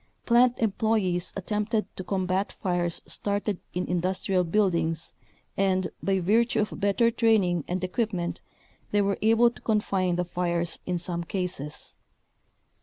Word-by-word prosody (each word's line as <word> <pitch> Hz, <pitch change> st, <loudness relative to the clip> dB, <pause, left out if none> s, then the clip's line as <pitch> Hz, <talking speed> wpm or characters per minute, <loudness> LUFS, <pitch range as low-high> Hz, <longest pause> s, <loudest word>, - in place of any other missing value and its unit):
Plant 245 Hz, +1 st, +4 dB
employees 210 Hz, -5 st, +1 dB
at 195 Hz, -, -5 dB
tempted 210 Hz, 0 st, 0 dB
to 185 Hz, -, -5 dB
combat 185 Hz, +1 st, -1 dB
fires 175 Hz, -3 st, -1 dB
started 205 Hz, -1 st, -2 dB, 0.2 s
in 180 Hz, -, -1 dB
industrial 185 Hz, +1 st, 0 dB
buildings 165 Hz, -3 st, +1 dB, 0.4 s
and, 190 Hz, -1 st, +1 dB
by 195 Hz, -1 st, +1 dB
virtue 225 Hz, +6 st, +2 dB
of 210 Hz, -, -3 dB
better 205 Hz, +4 st, +3 dB
training 210 Hz, -8 st, +2 dB
and 185 Hz, +1 st, -2 dB
equipment, 185 Hz, -2 st, -2 dB, 0.5 s
they 205 Hz, 0 st, +2 dB
were 200 Hz, 0 st, 0 dB
able 225 Hz, +2 st, +5 dB
to -, -, -14 dB
confine 195 Hz, -5 st, +1 dB
the 180 Hz, 0 st, 0 dB
fires 175 Hz, -1 st, -1 dB
in 180 Hz, -1 st, 0 dB
some 170 Hz, 0 st, -3 dB
cases. 175 Hz, -5 st, -4 dB
190 Hz, 135 wpm, -27 LUFS, 175-210 Hz, 0.5 s, able